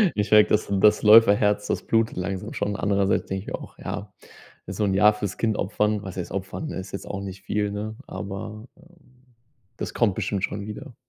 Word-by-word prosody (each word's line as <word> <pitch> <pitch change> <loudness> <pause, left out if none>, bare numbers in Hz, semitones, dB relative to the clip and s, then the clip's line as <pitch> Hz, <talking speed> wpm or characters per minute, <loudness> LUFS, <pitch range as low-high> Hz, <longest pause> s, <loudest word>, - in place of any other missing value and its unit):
Ich 105 0 -1
merke, 105 0 +7
das 105 - +2
das 105 +1 +5
Läuferherz, 105 -1 +6
das - - -2
blutet 115 0 +1
langsam 90 +1 -4
schon. 100 0 -2
Andererseits 100 -1 +1
denke 95 0 -2
ich - - -18
mir - - -3
auch: - - -12
„Ja, 100 -1 -6 0.5
so 95 +3 -2
'n 95 - +1
Jahr 105 +2 +6
fürs 105 -2 -4
Kind 110 -2 +1
opfern.“ 105 +1 0
Was 95 -2 -8
heißt 90 - -5
opfern? 100 +11 -4
Ist 95 0 -7
jetzt 100 - -6
auch 100 - -4
nicht 95 -1 -8
viel, 105 -1 -1
ne? 110 +1 -5
Aber, 105 +3 -7
ähm, 160 -7 -23 0.5
das - - -5
kommt 110 -5 +2
bestimmt 100 -2 -2
schon 100 +1 -3
wieder. 120 +5 -8
105 Hz, 200 wpm, -24 LUFS, 100-110 Hz, 0.5 s, merke